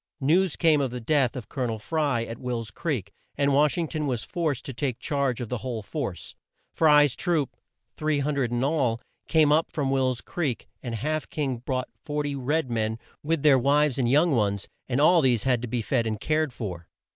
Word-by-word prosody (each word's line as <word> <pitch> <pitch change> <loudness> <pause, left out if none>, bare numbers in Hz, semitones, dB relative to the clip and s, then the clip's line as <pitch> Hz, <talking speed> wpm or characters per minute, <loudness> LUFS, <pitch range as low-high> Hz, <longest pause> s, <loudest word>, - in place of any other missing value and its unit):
News 165 +5 +2
came 160 -4 +3
of 135 - 0
the 125 +1 -5
death 135 +1 +1
of 125 -4 -6
Col 130 -3 -3
o - - 0
nel 110 -1 -2
Fry, 140 +1 0
at 115 0 -7
Will's 120 -4 -3
creek, 125 - -3 0.2
and 140 0 +2
Wash 150 +3 +3
ing 170 -2 0
ton 155 -1 -2
was 120 -4 -1
forced 155 -7 -2
to 135 - -5
take 125 0 -2
charge 140 -4 -1
of 120 -3 -5
the 125 - -2
whole 120 -4 -4
force. 120 - -5 0.4
Fry's 150 -4 +5
troops 160 -7 -1 0.4
300 145 -4 0
in 120 +1 0
all 135 -6 +1 0.3
came 155 -3 +4
up 155 +2 +2
from 140 -3 -1
Will's 130 -2 +1
Creek, 150 -9 -3
and 120 -3 -4
Half 155 +7 -2
King 135 -5 -2
brought 130 +1 -3
40 145 -1 -2
red 140 +1 -1
men 110 -1 -1 0.2
with 155 -1 -1
their 140 -3 +6
wives 140 +1 +2
and 120 -2 +2
young 155 +6 +4
ones 100 -3 0 0.2
and 125 - 0 0.3
these 120 -4 +2
all - - +2
had 120 -2 +1
to 125 - -4
be 120 0 -2
fed 120 -1 0
and 110 -1 -2
cared 155 +1 0
for. 90 -9 -6
135 Hz, 205 wpm, -26 LUFS, 120-150 Hz, 0.4 s, their